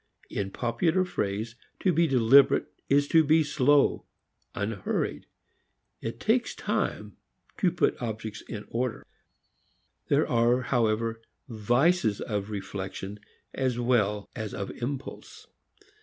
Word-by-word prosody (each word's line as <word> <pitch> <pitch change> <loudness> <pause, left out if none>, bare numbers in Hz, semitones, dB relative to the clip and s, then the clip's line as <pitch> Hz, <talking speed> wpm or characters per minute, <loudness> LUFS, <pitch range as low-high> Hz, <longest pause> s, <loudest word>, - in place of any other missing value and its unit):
In 95 -1 -2
popular 145 - 0
phrase, 110 - -3 0.3
to 185 - +3
be 165 +1 +3
deliberate 135 +2 +5 0.2
is 145 +1 +3
to 160 -1 +6
be 155 +2 +4
slow, 145 -1 +2 0.5
unhurried. 100 -1 -2 0.7
It 115 - -5
takes 235 +2 +1
time - - -2 0.4
to 185 -5 +2
put 175 - 0
objects 110 -2 -5
in 105 -2 -8
order. 120 -1 -2 1.0
There - - +3
are 120 +2 +3
however 115 -2 0 0.3
vices 120 - +2
of 105 -2 -3
reflection 100 0 -6 0.3
as 130 -3 -1
well 105 -4 +1
as 110 -1 -5
of 100 - -4
impulse. 130 +2 -6
120 Hz, 110 wpm, -27 LUFS, 105-140 Hz, 1.0 s, to